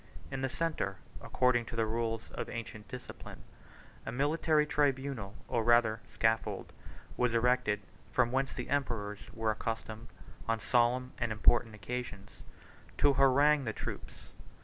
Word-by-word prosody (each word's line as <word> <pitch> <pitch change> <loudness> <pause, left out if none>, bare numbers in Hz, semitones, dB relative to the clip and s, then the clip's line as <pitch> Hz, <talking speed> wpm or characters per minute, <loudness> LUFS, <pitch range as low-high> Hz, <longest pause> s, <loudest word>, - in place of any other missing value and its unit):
In 135 -1 -3
the 135 - 0
centre, 145 -10 -2 0.2
according 125 -2 +2
to 115 - -7
the 115 -1 +2
rules 115 0 -1
of - - -5
ancient 110 -3 -6
discipline, 125 +5 -9 0.6
a - - -4
military 150 +4 +2
tribunal, 135 -8 0
or 115 - 0
rather 115 -1 +4
scaffold, 110 0 0 0.4
was 125 -1 +2
erected, 115 -3 +2 0.3
from 120 -2 +2
whence 135 +1 0
the 125 - -5
emperors 115 -7 -1
were 110 -1 0
accustomed, 110 +1 -4 0.4
on 115 0 +1
solemn 125 +2 +2
and 120 -3 0
important 110 +1 +3
occasions, 105 -1 -5 0.7
to 145 -1 +5
harangue 140 +2 +5
the 110 - -2
troops. - - -7
120 Hz, 135 wpm, -32 LUFS, 110-130 Hz, 0.7 s, to